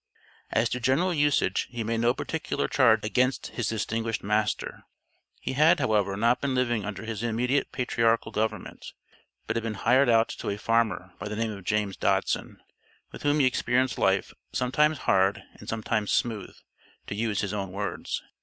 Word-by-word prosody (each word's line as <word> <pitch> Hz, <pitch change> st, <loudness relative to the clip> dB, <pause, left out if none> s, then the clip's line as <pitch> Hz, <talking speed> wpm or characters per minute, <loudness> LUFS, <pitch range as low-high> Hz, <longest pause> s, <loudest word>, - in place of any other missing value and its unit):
As 115 Hz, -, +2 dB
to 125 Hz, -, -2 dB
general 135 Hz, +9 st, +2 dB
usage, 145 Hz, -, +1 dB
he 120 Hz, -2 st, -4 dB
made 115 Hz, +1 st, -1 dB
no 120 Hz, +1 st, +3 dB
particular 160 Hz, +4 st, -2 dB
charge 115 Hz, -5 st, +4 dB
against 125 Hz, +4 st, +1 dB
his 120 Hz, -3 st, -3 dB
distinguished 115 Hz, +1 st, -2 dB
master; 105 Hz, +1 st, -1 dB, 0.6 s
he -, -, -4 dB
had, 155 Hz, +5 st, +5 dB
however, 105 Hz, -6 st, +1 dB
not 115 Hz, +4 st, +2 dB
been 135 Hz, -2 st, -1 dB
living 120 Hz, -4 st, +1 dB
under 105 Hz, +1 st, -5 dB
his 110 Hz, -2 st, -4 dB
immediate 120 Hz, +4 st, 0 dB
patriarchal 115 Hz, -3 st, +1 dB
government, 110 Hz, +1 st, -3 dB, 0.5 s
but 110 Hz, -, -2 dB
had 115 Hz, -, 0 dB
been 115 Hz, -1 st, -3 dB
hired 125 Hz, +6 st, +3 dB
out 115 Hz, 0 st, +4 dB
to -, -, -5 dB
a 100 Hz, -, -2 dB
farmer 110 Hz, -5 st, 0 dB
by -, -, -5 dB
the 105 Hz, -, -4 dB
name 115 Hz, 0 st, -1 dB
of 100 Hz, -3 st, -9 dB
James 105 Hz, -1 st, 0 dB
Dodson, -, -, -1 dB, 0.5 s
with -, -, -10 dB
whom 145 Hz, +1 st, +2 dB
he -, -, +4 dB
experienced 130 Hz, 0 st, +1 dB
life 95 Hz, 0 st, +1 dB, 0.2 s
"sometimes 150 Hz, +5 st, +2 dB
hard 95 Hz, 0 st, +2 dB, 0.2 s
and -, -, -10 dB
sometimes 110 Hz, -1 st, -1 dB
smooth," 110 Hz, -5 st, -1 dB, 0.5 s
to -, -, -5 dB
use 105 Hz, -1 st, -1 dB
his 100 Hz, -1 st, -3 dB
own 100 Hz, -3 st, -3 dB
words. 100 Hz, +1 st, -4 dB
115 Hz, 175 wpm, -27 LUFS, 105-125 Hz, 0.6 s, had